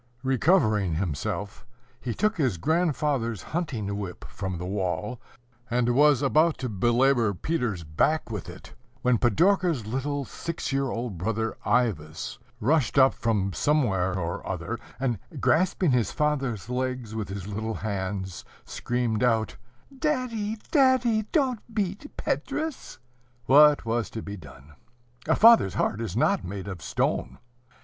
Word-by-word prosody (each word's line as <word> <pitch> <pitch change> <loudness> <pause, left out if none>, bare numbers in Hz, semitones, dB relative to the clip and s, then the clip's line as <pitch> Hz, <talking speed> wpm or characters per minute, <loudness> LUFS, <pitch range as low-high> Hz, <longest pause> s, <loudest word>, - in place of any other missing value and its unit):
Recovering 120 - +2
himself, 95 +4 -3 0.4
he 120 -3 -4
took 215 +1 +1
his 130 - +1
grandfather's 145 - 0
hunting 110 - -2
whip 95 -3 -6
from 95 -2 -5
the 90 - -5
wall, 95 +4 -2 0.5
and 120 0 +1
was 145 +1 +4
about 155 +4 +3
to 130 - -3
belabor 120 +1 +2
Peter's 120 - -2
back 115 - 0
with 105 -5 -5
it, - - -12 0.3
when 125 -2 +3
Pidorka's 170 - +2
little 135 +5 -2
six 165 -1 -5
year 135 0 +1
old 115 -7 -4
brother 110 +4 -1
Ivas 105 - -1 0.2
rushed 140 +4 +1
up 135 0 +6
from 100 -4 0
somewhere 95 -11 +1
or 85 -1 -3
other, - - -3 0.2
and, 125 -6 -1 0.2
grasping 180 -1 +2
his 120 -5 +1
father's 135 -9 -1
legs 125 -2 -3
with 110 -3 -4
his 95 -1 -5
little 110 +2 -3
hands, 95 -3 -4 0.2
screamed 120 -3 -2
out, 110 -5 +1 0.4
"Daddy, 250 -7 -1
daddy! 255 -6 +3
don't 260 -8 +1
beat 205 +7 -2
Petrus!" 315 -2 -3 0.5
What 145 0 +6
was 115 0 -1
to 110 - -6
be 100 - -6
done? 75 -4 -14 0.5
A - - +4
father's 225 - +6
heart 110 - 0
is 110 -3 -3
not 120 - +2
made 95 +1 -6
of 95 -4 -6
stone. 65 -5 -1
120 Hz, 135 wpm, -26 LUFS, 100-150 Hz, 0.5 s, up